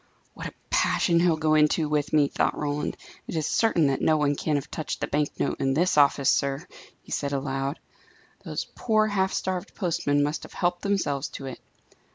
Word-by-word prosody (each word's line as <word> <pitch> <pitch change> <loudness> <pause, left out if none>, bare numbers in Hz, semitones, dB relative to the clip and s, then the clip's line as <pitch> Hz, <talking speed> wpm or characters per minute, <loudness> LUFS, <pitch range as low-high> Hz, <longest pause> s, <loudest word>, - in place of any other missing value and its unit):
"What - - -6
a - - -9 0.2
passion 170 -2 +3
he'll 170 -2 +3
go 155 0 +2
into 155 +1 +3
with 150 -1 0
me!" 150 -2 +4
thought - - 0
Roland. 145 0 -2 0.3
"It - - -5
is 155 -2 0
certain 200 -7 +2
that 135 -1 +1
no 155 - +3
one 145 -1 +1
can 150 +1 -1
have 140 -1 -3
touched 155 - -4
the - - -1
bank 150 0 0
note - - -1
in 135 0 +1
this 175 +4 +2
office, 140 -2 +4
sir," 140 +3 0 0.4
he - - -15
said 140 -1 -1
aloud. 135 +1 -2 0.7
"Those - - -4
poor, 215 -2 +2
half 195 -2 +1
starved 185 -2 -3
postmen 145 -6 +1
must 150 +2 -1
have - - -11
helped 175 0 0
themselves 155 -9 0
to 135 - -8
it." 130 - -7
150 Hz, 200 wpm, -26 LUFS, 140-175 Hz, 0.7 s, me